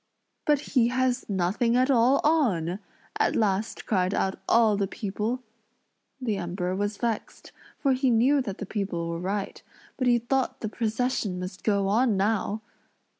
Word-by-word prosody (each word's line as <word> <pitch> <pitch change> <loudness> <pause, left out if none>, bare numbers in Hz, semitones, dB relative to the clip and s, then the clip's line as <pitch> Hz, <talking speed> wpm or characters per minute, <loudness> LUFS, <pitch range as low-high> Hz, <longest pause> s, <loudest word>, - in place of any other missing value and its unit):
"But 295 -2 +3
he 245 -4 +5
has 255 0 0
nothing 200 +6 +1
at 255 +2 +3
all 255 +2 +4
on!" 205 - +2 0.4
at - - +2
last 210 0 0
cried 185 -2 +1
out 190 0 -1
all 225 -2 +5
the 200 -1 0
people. 215 +5 -3 0.8
The 225 -6 -1
Emperor 180 0 -2
was 205 +1 -2
vexed, 230 -3 -4 0.3
for 275 -2 +2
he 260 0 +1
knew 255 +5 +4
that 200 -6 -5
the 205 - -5
people 190 -5 -3
were 170 0 -3
right; 195 +3 -3 0.4
but 255 - 0
he 240 -1 +5
thought 255 +3 -1
the 220 - -2
procession 225 -3 -1
must 185 +1 -7
go 200 -2 +2
on 220 +1 +2
now! 210 +1 0
215 Hz, 160 wpm, -26 LUFS, 195-250 Hz, 0.8 s, he